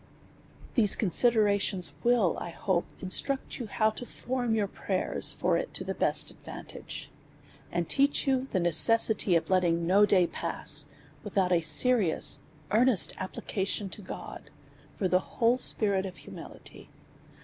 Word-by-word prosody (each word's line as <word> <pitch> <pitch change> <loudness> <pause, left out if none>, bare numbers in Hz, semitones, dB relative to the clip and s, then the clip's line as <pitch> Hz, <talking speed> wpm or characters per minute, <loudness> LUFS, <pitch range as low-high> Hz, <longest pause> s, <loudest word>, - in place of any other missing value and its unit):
These 215 -6 +4
considerations 200 - +2
will^ 235 -7 +2
I - - -6
hope, 175 +1 -2 0.2
instruct 270 +11 0
you 240 - -6
how 215 +2 0
to 220 - -9
form 245 -1 -3
your 210 -2 0
prayers - - 0
for - - 0
it - - -6
to - - 0
the - - -4
best - - +2
advantage; - - -10 0.6
and 175 -1 -2
teach 280 +1 +2
you 265 -1 0
the 190 - -1
necessity 175 +4 +5
of 165 +2 -1
letting 170 -2 +1
no 200 +4 +4
day 185 -3 +3
pass, - - -4 0.4
without 195 -3 -1
a 175 -2 +2
serious, 205 +1 +1 0.3
earnest 230 -2 +2
application 190 +1 -4
to 210 - -8
God, 185 - -10 0.5
for 190 - -1
the 185 0 +2
whole 235 +5 0
spirit 200 -6 0
of 185 - -11
humility. - - -13
200 Hz, 140 wpm, -28 LUFS, 180-230 Hz, 0.6 s, necessity